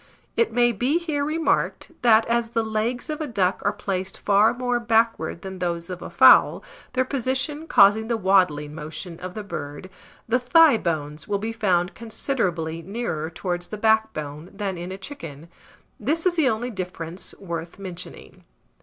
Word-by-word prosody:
It 465 Hz, -, +2 dB
may 240 Hz, 0 st, +4 dB
be 250 Hz, +8 st, +1 dB
here 315 Hz, -4 st, -2 dB
remarked, 315 Hz, +2 st, 0 dB
that 225 Hz, -2 st, +5 dB
as 235 Hz, 0 st, 0 dB
the 230 Hz, -1 st, 0 dB
legs 220 Hz, +4 st, -2 dB
of 305 Hz, 0 st, -4 dB
a 305 Hz, -, -2 dB
duck 195 Hz, -6 st, 0 dB
are 205 Hz, -, +2 dB
placed 195 Hz, -2 st, -4 dB
far 205 Hz, +2 st, +4 dB
more 245 Hz, 0 st, -1 dB
backward 225 Hz, -8 st, +1 dB
than 190 Hz, -1 st, -7 dB
those 170 Hz, -1 st, -2 dB
of 180 Hz, -1 st, -6 dB
a -, -, -7 dB
fowl, -, -, +6 dB, 0.3 s
their 255 Hz, -1 st, +1 dB
position 275 Hz, +4 st, -2 dB
causing 210 Hz, -1 st, +5 dB
the 235 Hz, -1 st, 0 dB
waddling 180 Hz, -7 st, +2 dB
motion 160 Hz, +3 st, -7 dB
of 185 Hz, 0 st, -7 dB
the 215 Hz, -, -5 dB
bird, 145 Hz, -2 st, -7 dB, 0.4 s
the 240 Hz, +3 st, +2 dB
thigh 295 Hz, +1 st, +6 dB
bones 150 Hz, -5 st, -3 dB
will 205 Hz, -, 0 dB
be 220 Hz, +3 st, -4 dB
found 185 Hz, -5 st, +1 dB
considerably 185 Hz, -, -2 dB
nearer 170 Hz, -5 st, -3 dB
towards 175 Hz, +1 st, -4 dB
the 215 Hz, -, -6 dB
backbone 180 Hz, -8 st, 0 dB
than 200 Hz, -2 st, -3 dB
in 175 Hz, +1 st, -6 dB
a 190 Hz, -, -5 dB
chicken: 165 Hz, -, -9 dB, 0.5 s
this 310 Hz, -, -1 dB
is 365 Hz, -, +3 dB
the 310 Hz, -6 st, +3 dB
only 240 Hz, +2 st, -2 dB
difference 180 Hz, -3 st, -5 dB
worth 170 Hz, -3 st, -6 dB
mentioning. 185 Hz, -2 st, -9 dB
205 Hz, 170 wpm, -24 LUFS, 175-240 Hz, 0.5 s, fowl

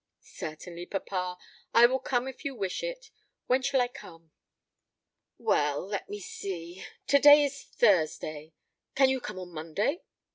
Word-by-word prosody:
"Certainly, 170 Hz, +3 st, -8 dB
papa; 180 Hz, -2 st, -3 dB, 0.4 s
I 235 Hz, +1 st, +9 dB
will 260 Hz, +2 st, +2 dB
come 255 Hz, -1 st, -1 dB
if 265 Hz, +2 st, -8 dB
you 280 Hz, -3 st, -3 dB
wish 195 Hz, -, -3 dB
it. -, -, -6 dB, 0.3 s
When 255 Hz, +1 st, +2 dB
shall 275 Hz, 0 st, +1 dB
I 245 Hz, -, +2 dB
come?" 165 Hz, -10 st, -14 dB, 1.1 s
"Well, 145 Hz, +2 st, +1 dB
let 200 Hz, 0 st, -4 dB
me 205 Hz, -, -5 dB
see 180 Hz, -2 st, -7 dB, 0.2 s
to 280 Hz, -, +4 dB
day 290 Hz, +1 st, +9 dB
is 280 Hz, 0 st, -3 dB
Thursday; 155 Hz, -6 st, +1 dB, 0.4 s
can 270 Hz, -1 st, +5 dB
you 265 Hz, -1 st, 0 dB
come -, -, -6 dB
on 180 Hz, -1 st, -8 dB
Monday?" 165 Hz, -, -2 dB
200 Hz, 150 wpm, -29 LUFS, 170-265 Hz, 1.1 s, I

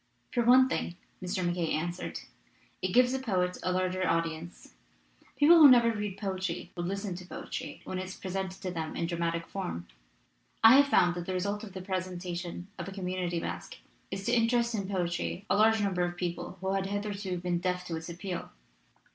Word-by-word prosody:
"For 240 Hz, -, +2 dB
one 255 Hz, +2 st, +7 dB
thing," 175 Hz, -, -2 dB, 0.3 s
Mr. 185 Hz, 0 st, -2 dB
MacKaye 175 Hz, -2 st, 0 dB
answered, 175 Hz, +3 st, -3 dB, 0.6 s
"it -, -, +1 dB
gives 250 Hz, +4 st, +5 dB
the 265 Hz, -, -1 dB
poet 180 Hz, -7 st, 0 dB
a 185 Hz, -, 0 dB
larger 185 Hz, 0 st, 0 dB
audience. 165 Hz, 0 st, -2 dB, 0.6 s
People 330 Hz, +4 st, +7 dB
who 300 Hz, -3 st, +11 dB
never 240 Hz, -2 st, +6 dB
read 210 Hz, -3 st, -4 dB
poetry 190 Hz, -3 st, -3 dB
will 175 Hz, -1 st, -3 dB
listen 195 Hz, +1 st, -3 dB
to 180 Hz, 0 st, -9 dB
poetry -, -, -6 dB
when 185 Hz, -, -4 dB
it 185 Hz, -, -3 dB
is 190 Hz, -, -8 dB
presented 190 Hz, 0 st, -4 dB
to 185 Hz, -, -2 dB
them 160 Hz, -2 st, -4 dB
in -, -, -1 dB
dramatic 170 Hz, -1 st, -1 dB
form. 180 Hz, -, -5 dB, 0.8 s
I 225 Hz, +4 st, +10 dB
have 285 Hz, 0 st, +6 dB
found 175 Hz, -10 st, +4 dB
that 175 Hz, 0 st, -6 dB
the 185 Hz, -, -1 dB
result 200 Hz, +3 st, -2 dB
of 200 Hz, -4 st, -9 dB
the 190 Hz, -1 st, -6 dB
presentation 180 Hz, -2 st, -4 dB
of -, -, -4 dB
a -, -, -5 dB
community 180 Hz, -2 st, -2 dB
masque -, -, -6 dB, 0.3 s
is 195 Hz, 0 st, -5 dB
to -, -, +1 dB
interest 235 Hz, 0 st, +3 dB
in 200 Hz, -3 st, -2 dB
poetry 180 Hz, 0 st, -2 dB
a -, -, +5 dB
large 220 Hz, +1 st, +4 dB
number 190 Hz, -3 st, 0 dB
of 175 Hz, 0 st, -2 dB
people 175 Hz, +1 st, -4 dB
who 190 Hz, 0 st, 0 dB
had 195 Hz, 0 st, 0 dB
hitherto 200 Hz, -2 st, -3 dB
been 175 Hz, 0 st, -1 dB
deaf 180 Hz, 0 st, -1 dB
to 170 Hz, -, -3 dB
its 160 Hz, +1 st, -6 dB
appeal. 175 Hz, +1 st, -5 dB
185 Hz, 195 wpm, -30 LUFS, 175-205 Hz, 0.8 s, who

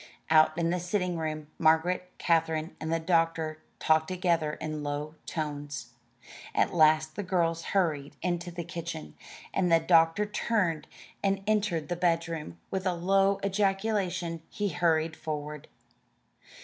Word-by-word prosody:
Out 155 Hz, 0 st, +5 dB
in 170 Hz, 0 st, +1 dB
the 180 Hz, -, 0 dB
sitting 180 Hz, 0 st, -1 dB
room, 155 Hz, -1 st, -3 dB
Margaret, 170 Hz, +3 st, +3 dB
Katherine, 160 Hz, -1 st, +1 dB
and 160 Hz, -, -3 dB
the 165 Hz, -, +1 dB
doctor 165 Hz, -2 st, +1 dB, 0.2 s
talked 160 Hz, 0 st, +3 dB
together 170 Hz, -4 st, 0 dB
in 155 Hz, -1 st, -4 dB
low 145 Hz, +1 st, -3 dB
tones. 145 Hz, -5 st, -4 dB, 0.6 s
At -, -, +2 dB
last 155 Hz, -1 st, +4 dB
the -, -, -2 dB
girls 170 Hz, -3 st, 0 dB
hurried 150 Hz, -6 st, 0 dB
into 175 Hz, 0 st, -1 dB
the 170 Hz, 0 st, -5 dB
kitchen, 170 Hz, -, -6 dB, 0.4 s
and 180 Hz, -3 st, +1 dB
the 165 Hz, -, +6 dB
doctor 165 Hz, +4 st, +4 dB
turned 205 Hz, -6 st, 0 dB, 0.4 s
and 195 Hz, 0 st, +1 dB
entered 205 Hz, -7 st, +1 dB
the 175 Hz, -, -2 dB
bedroom. 165 Hz, -, -1 dB
With 190 Hz, 0 st, -1 dB
a 180 Hz, -, +1 dB
low 195 Hz, +3 st, +2 dB
ejaculation 195 Hz, -4 st, 0 dB
he 205 Hz, -2 st, -2 dB
hurried 165 Hz, -3 st, +1 dB
forward. 150 Hz, -1 st, -5 dB
165 Hz, 135 wpm, -29 LUFS, 155-180 Hz, 0.6 s, the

